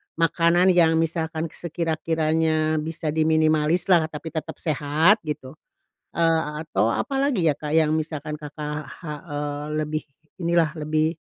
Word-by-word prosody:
makanan 170 +2 +3
yang 165 -2 +4
misalkan 160 0 -1
sekira-kiranya 160 -1 0
bisa 155 0 -3
diminimalislah, 160 +2 +3
tapi 160 +1 -7
tetap 160 +1 -5
sehat, 155 +6 +3
gitu. 150 0 -6 0.5
Eee, 165 -1 +2 0.2
a 150 0 -5
atau 115 -6 +1
apa 275 - -2
lagi 230 - +1
ya, 150 - +3
Kak, 150 +1 -6
yang 155 -1 +3
misalkan 155 -1 -3
Kakak 150 0 -6
ha 155 -1 -8 0.2
eee, 145 0 -3
lebih 155 0 -2 0.4
inilah 170 -2 +2
lebih 155 +1 0
155 Hz, 135 wpm, -24 LUFS, 150-165 Hz, 0.5 s, yang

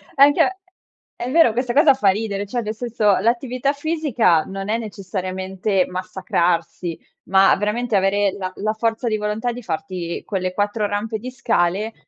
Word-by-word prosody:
Anche 290 +7 +5 0.6
È 245 - -4
vero, 315 -7 +5
questa 245 +1 -1
cosa 290 +1 +6
fa 235 -7 +2
ridere, 205 0 -1
cioè, 240 +4 -3
nel 215 0 -4
senso, 220 -4 +1
l'attività 250 +5 0
fisica 280 - +1
non 195 +1 -6
è 220 - +1
necessariamente 190 -2 -2
massacrarsi, 180 -3 -2 0.3
ma 195 0 +5
veramente 215 +3 -1
avere 195 +1 +2
la 185 -1 -4
la 215 +2 -1
forza 225 +2 -1
di 215 - 0
volontà 210 +3 -2
di 245 - -7
farti 180 -2 -4
quelle 185 -3 -2
4 205 +2 0
rampe 215 +2 -3
di 250 +4 -7
scale 220 -4 0
210 Hz, 155 wpm, -21 LUFS, 190-240 Hz, 0.6 s, cosa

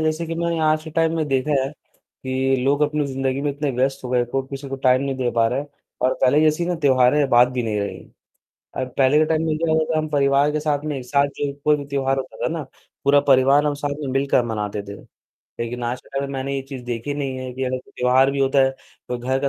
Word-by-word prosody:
जैसे 155 +1 -1
कि 165 - -4
मैंने 170 0 -1
आज 155 0 +2
के 160 - -8
टाइम 165 +1 +1
में 155 -2 0
देखा 135 +2 0
है, 135 - -2
कि 130 -2 -4
लोग 140 +2 +2
अपनी 150 0 +1
ज़िंदगी 135 0 -2
में 145 - 0
इतने 145 0 -2
व्यस्त 130 +1 -1
हो - - -4
गए 125 -1 +2
को, 135 +3 -2
किसी 135 +1 -8
को 135 - -4
टाइम 130 0 +3
नहीं 135 -1 -2
दे 125 -2 0
पा 115 -1 +2
रहे 135 - -1
हैं 145 - -7 0.4
और 130 +1 +2
पहले 145 +4 +5
जैसी 155 +2 +2
ना 180 - 0
त्योहार 130 -1 +5
है 150 -2 +3
बात 120 0 +5
भी 125 -1 -2
नहीं 110 -2 -1
रही। 100 - -4 0.8
अ, 130 - -1
पहले 135 +2 +4
के 155 - +4
टाइम 160 +1 0
में 155 -1 0
क्या 165 0 0
होता, 160 0 +1
हम 155 0 -1
परिवार 140 0 +3
के 155 - -1
साथ 150 -1 -1
में 150 -2 -2
एक 125 - -7
साथ 140 +2 +2
जो 145 -1 -1
कोई 150 0 +4
भी 140 - -6
त्योहार 135 -1 -1
होता 130 -1 -6
था - - +2
ना, 160 -3 -3 0.4
पूरा 140 +1 +5
परिवार 135 +2 +5
हम 150 - +1
साथ 145 0 0
में 145 - -3
मिलकर 135 -1 +2
मनाते 105 -2 -3
थे। 100 - -7 0.7
लेकिन 120 +1 -4
आज 120 +1 -3
के - - -22
टाइम - - -1
में - - -6
मैंने 135 +1 -3
ये 135 - -3
चीज़ 130 -3 -7
देखी 120 +3 -3
नहीं 135 -2 -3
है, 130 0 -5
कि 130 +1 -3
अगर 130 0 -1
त्योहार 130 +2 +3
भी 140 - -3
होता 135 +1 +2
है, 135 - +2 0.4
तो 125 - -3
घर 130 +2 -1
का 140 - +1
135 Hz, 265 wpm, -22 LUFS, 130-150 Hz, 0.8 s, पहले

